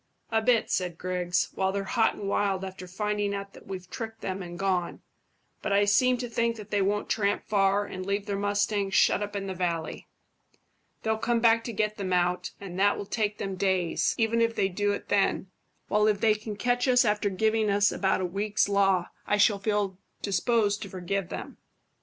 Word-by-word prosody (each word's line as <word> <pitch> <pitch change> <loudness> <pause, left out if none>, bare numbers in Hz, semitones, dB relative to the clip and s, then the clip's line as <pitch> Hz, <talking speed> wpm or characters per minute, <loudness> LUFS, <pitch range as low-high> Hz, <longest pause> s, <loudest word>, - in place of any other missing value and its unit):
"A 225 0 +2
bit," 230 0 +2
said 180 -3 -1
Griggs, 180 0 -1
"while 190 0 0
they're 200 0 -2
hot 225 +3 +1
and 200 - -6
wild 195 -1 0
after 185 -1 -8
finding 205 +2 -1
out 200 0 -6
that - - -15
we've 185 -2 -6
tricked 225 +2 -7
them 190 0 -3
and 175 -1 -7
gone; 185 -3 -1 0.6
but - - -2
I 200 +1 +4
seem 250 +5 +3
to 245 0 -4
think 235 0 0
that 210 -2 -11
they 205 -1 +2
won't 205 +2 0
tramp 205 -2 0
far 200 0 +2
and 185 -2 -6
leave 200 +1 -2
their 200 -1 -2
mustangs 205 0 0
shut - - +4
up 205 0 -4
in 200 -1 -3
the 190 - -3
valley. 170 -3 -3 1.0
They'll 220 0 0
come 235 +1 +1
back 230 0 +4
to 235 - -3
get 215 0 -1
them 190 -3 -2
out, 180 0 +1
and 190 -2 -7
that 205 +1 +3
will 205 - -5
take 210 0 -1
them 195 - -3
days, 185 -3 +1
even 230 0 +2
if 230 0 +1
they 195 - +1
do 205 +2 0
it - - -5
then; 195 -2 +1 0.4
while 210 0 +3
if 210 -2 +2
they 220 0 +4
can 215 0 -6
catch 245 +4 0
us 250 -1 +5
after 210 -1 +1
giving 220 +2 +1
us 200 0 +3
about 190 -1 0
a - - 0
week's 200 +4 0
law, 195 -3 +2 0.2
I 205 - +2
shall 205 0 +4
feel 200 -2 -1 0.2
disposed 205 +1 +1
to 200 - -6
forgive 185 0 -3
them." - - -7
200 Hz, 205 wpm, -27 LUFS, 190-215 Hz, 1.0 s, us